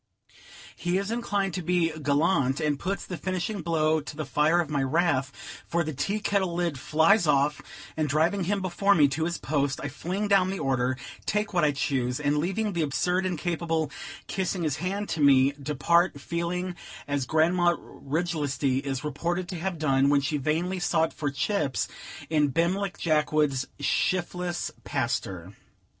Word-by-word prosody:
He 175 +1 -1
is 200 +2 -2
inclined 205 -5 -1
to 180 - -2
be 175 -1 +1
gallant, 145 -2 +1
and 150 -3 0
puts 195 +2 -3
the 180 - -5
finishing 185 +4 -3
blow 160 -1 +1
to 150 - -8
the 155 0 -4
fire 155 +5 +2
of 170 - 0
my 145 -1 -1
wrath; 140 -1 +1 0.4
for 170 +1 +1
the 155 -1 -4
tea 200 +10 -1
kettle 195 -4 0
lid 170 -6 -1
flies 160 +7 +3
off, 145 0 +2 0.3
and 155 -2 0
driving 165 +6 +2
him 195 +1 0
before 195 +2 +2
me 150 -3 +6
to 155 +4 -1
his 170 0 -2
post, 140 -2 -1
I 140 - -4
fling 185 +9 -3
down 195 -2 +4
the 195 - -2
order, 130 -3 0 0.3
take 210 0 0
what 175 -2 +2
I 150 - +4
choose; 130 -2 -1
and, 150 0 +1
leaving 200 +6 -1
the 170 - 0
absurd 180 +5 +1
incapable 165 -3 -1 0.3
kissing 185 -2 -2
his 150 -3 0
hand 195 +5 -2
to 160 - -2
me, 135 -1 +5
depart, 150 +3 +2
feeling 175 +4 -3 0.3
as 140 -3 -1
Grandma 175 +3 +3
Riglesty 145 -4 -2
is 135 -2 -3
reported 170 +5 -2
to 180 - -4
have 185 0 -2
done, 140 -3 +3
when 140 -1 +4
she 145 +2 -1
vainly 165 +6 -1
sought 165 -2 +1
for 145 - -2
chips, 140 -1 -1 0.4
in 150 -2 +2
Bimleck 180 +5 0
Jackwood's 150 -4 +1
"shifless 175 +3 -1
paster." 95 -5 -3
160 Hz, 165 wpm, -27 LUFS, 145-180 Hz, 0.4 s, me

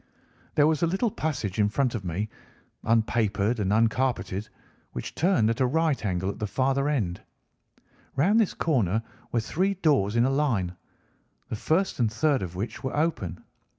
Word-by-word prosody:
"There 145 - +5
was 155 -1 +2
a 170 - +3
little 195 +6 0
passage 120 - -3
in 105 0 +4
front 130 +2 0
of 110 -5 -3
me, 90 +4 -2 0.6
unpapered 110 -1 +1
and 100 -2 0
uncarpeted, 115 -2 +1 0.4
which 60 - -5
turned 165 - +3
at 115 - -2
a 130 - +4
right 160 -1 +1
angle 95 -1 -1
at - - -11
the 105 - -1
farther 135 +5 +1
end. 100 -12 -1 0.9
Round 195 +11 +4
this 220 - +1
corner 115 - +1 0.3
were 120 - +1
three 190 - 0
doors 140 - +2
in 120 +1 +4
a 135 - +2
line, 115 -11 0 0.7
the - - -2
first 165 - 0
and 115 -3 +2
third 145 +2 +2
of 90 -2 -5
which 110 +5 -5
were 130 +2 -3
open. 105 - -1
120 Hz, 170 wpm, -27 LUFS, 105-150 Hz, 0.9 s, There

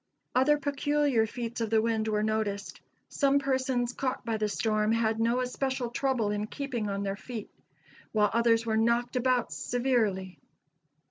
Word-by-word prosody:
Other 280 +4 +4
peculiar 285 -4 +1
feats 235 +1 -5
of 225 - -1
the 220 0 +4
wind 220 -1 0
were 210 -1 +1
noticed. 215 -2 -2 0.3
Some 280 -1 +2
persons 260 -3 0
caught 255 -2 -3
by 225 -2 -1
the 215 -1 0
storm, 215 +1 +1
had 225 -1 +1
no 235 +2 +2
especial 255 -1 -2
trouble 245 -5 0
in 210 0 -2
keeping 245 -5 -3
on 200 0 -2
their 195 0 -2
feet; 220 0 -7 0.6
while 210 -1 +2
others 230 0 +3
were 220 -1 +1
knocked 235 +2 +1
about 250 -1 +1
severely. 220 -8 0
230 Hz, 155 wpm, -29 LUFS, 215-255 Hz, 0.6 s, Other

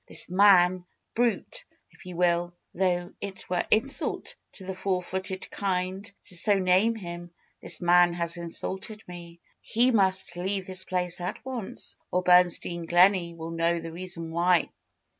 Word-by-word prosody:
This - - 0
man 185 -2 +5
— - - -52
brute! 245 - 0 0.3
if - - -16
you 180 - -7
will, 175 0 +1 0.2
though 175 -1 0
it 195 -2 -7
were 180 - +1
insult 275 +6 -1 0.2
to 190 - -8
the 190 - -4
four 185 -1 -1
footed 190 +1 -4
kind 190 +1 -2
to 185 - -8
so 200 +4 +2
name 190 +5 +3
him 175 -4 -7 0.2
— - - -41
this - - -4
man 175 0 +5
has 170 0 -2
insulted 190 +5 -5
me. 170 -1 -10 0.2
He 245 +3 +2
must 190 -4 +2
leave 190 +2 -2
this 185 0 -3
place 180 -1 -2
at 180 +7 -5
once, 250 -6 -5
or 180 0 0
Bernstein 175 -1 +3
Gleney 175 -1 +4
will 165 0 -7
know 165 +1 +1
the 165 0 -7
reason 170 -1 -6
why." 175 +1 +2
180 Hz, 160 wpm, -27 LUFS, 175-190 Hz, 0.3 s, man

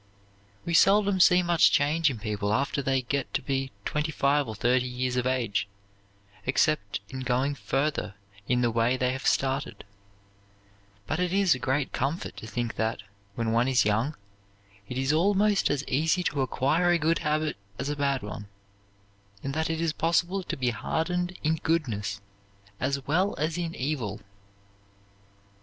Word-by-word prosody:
We 170 - -2
seldom 200 +2 +4
see 180 0 +6
much 175 -1 +4
change 155 +2 +3
in 130 - -4
people 105 -1 -2
after 140 +2 0
they 135 -1 0
get 140 +2 -2
to 140 - +1
be 135 0 -2
twenty 150 +1 -1
five 140 -1 +2
or 110 - -5
thirty 125 +4 +2
years 125 0 -2
of 125 0 0
age, 120 -6 0 0.8
except 130 -6 +1
in 130 - -6
going 130 +2 0
further 140 -5 -2 0.3
in 125 0 +2
the 120 -1 +2
way 115 +3 +2
they 125 0 +1
have 130 +1 -3
started; 135 +1 0 1.2
but 155 +10 -2
it 180 -1 0
is 195 -2 +4
a 130 - -4
great 135 +2 -1
comfort 140 +7 -2
to 110 - -8
think 120 0 -3
that, 110 -2 -1 0.3
when 115 -1 -1
one 120 +2 +2
is 130 -4 +3
young, 115 +9 +1 0.7
it 125 - -4
is 135 +3 +1
almost 200 +4 +3
as 140 -1 0
easy 160 +6 +1
to 150 -5 -1
acquire 150 +7 +1
a 175 - +4
good 165 +1 +1
habit 155 0 0 0.2
as 130 - -3
a 145 - -1
bad 140 -2 0
one, 105 0 -7 1.0
and 135 - -3
that 160 +2 -1
it 160 0 -1
is 165 -2 0
possible 170 +4 +1
to 180 - -5
be 125 -2 +1
hardened 175 +9 -2
in 160 +1 +2
goodness 110 -12 -1 0.6
as 140 0 -1
well 185 +7 +1
as 155 +2 -1
in 170 -2 -3
evil. 125 -7 -3
140 Hz, 165 wpm, -27 LUFS, 125-160 Hz, 1.2 s, see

